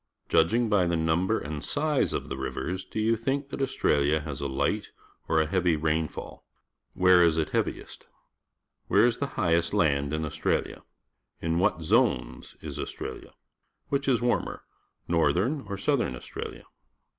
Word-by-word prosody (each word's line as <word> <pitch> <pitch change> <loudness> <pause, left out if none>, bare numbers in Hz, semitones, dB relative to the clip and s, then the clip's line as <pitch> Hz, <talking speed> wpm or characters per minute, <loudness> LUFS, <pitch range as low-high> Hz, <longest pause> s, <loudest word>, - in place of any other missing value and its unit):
Judging 115 +9 +3
by 100 -5 +3
the 85 - +1
num 80 +3 +1
ber 110 - +2
and 75 0 -5
size 150 -1 0
of - - -3
the - - -4
rivers, 90 +7 -4
do - - -9
j'ou 110 +1 +3
think 135 +4 -1
that - - -5
Australia 75 - +2
has 75 -4 -6
a 70 - -1
light 65 0 -1 0.4
or 80 - +3
a 80 - +3
hea\'>' 90 -1 +1
rain 80 +1 +1
fall? - - -9 0.5
Where 90 -1 +6
is 80 -2 +3
it 80 - 0
heav - - +2
iest? - - -8 0.8
Where - - +5
is 120 -1 +2
the 140 - -1
high 85 -2 +2
est 85 +2 +1
land 70 -6 +2
in 80 +1 -1
Australia? 75 - -2 0.6
In 80 +1 0
what 85 -2 +1
zones 60 -5 +1
is - - -6
Australia? - - -6 0.5
Which 140 -1 -1
is 125 -3 +2
warmer, 120 - -1 0.4
Northern 90 - +1
or 100 - -3
Southern 120 - 0
Australia? - - -7
85 Hz, 170 wpm, -27 LUFS, 80-115 Hz, 0.8 s, Where